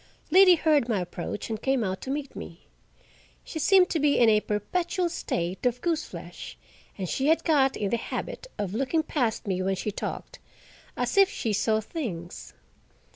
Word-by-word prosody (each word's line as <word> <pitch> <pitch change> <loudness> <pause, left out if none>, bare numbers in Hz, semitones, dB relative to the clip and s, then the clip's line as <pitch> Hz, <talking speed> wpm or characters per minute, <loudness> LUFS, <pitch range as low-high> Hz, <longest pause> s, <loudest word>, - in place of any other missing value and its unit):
Liddy 370 +1 +8
heard 305 -6 +2
my 215 -4 +1
approach 175 +2 -5
and 220 0 -3
came 265 -3 +1
out 190 -1 -3
to - - -7
meet 280 0 -4
me. 170 0 -9 0.8
She 320 - -6
seemed 365 +4 +5
to 325 - +1
be 290 0 +3
in 235 -2 +6
a 215 -1 +5
perpetual 345 - -1
state 175 - -3
of 245 0 -1
goose 325 0 -1
flesh, - - -9 0.4
and 190 -2 -3
she 270 - -1
had 320 +2 +3
got 275 -5 +3
in 200 -2 -2
the 235 - +2
habit 365 - -5
of 200 -2 -3
looking 270 +7 0
past 250 -8 -1
me 185 -2 -1
when 190 +1 0
she 210 +3 -3
talked, - - -6 0.6
as - - -1
if 390 -1 +7
she 225 - -2
saw 220 +2 +1
things. 205 - -6
250 Hz, 180 wpm, -27 LUFS, 205-320 Hz, 0.8 s, Liddy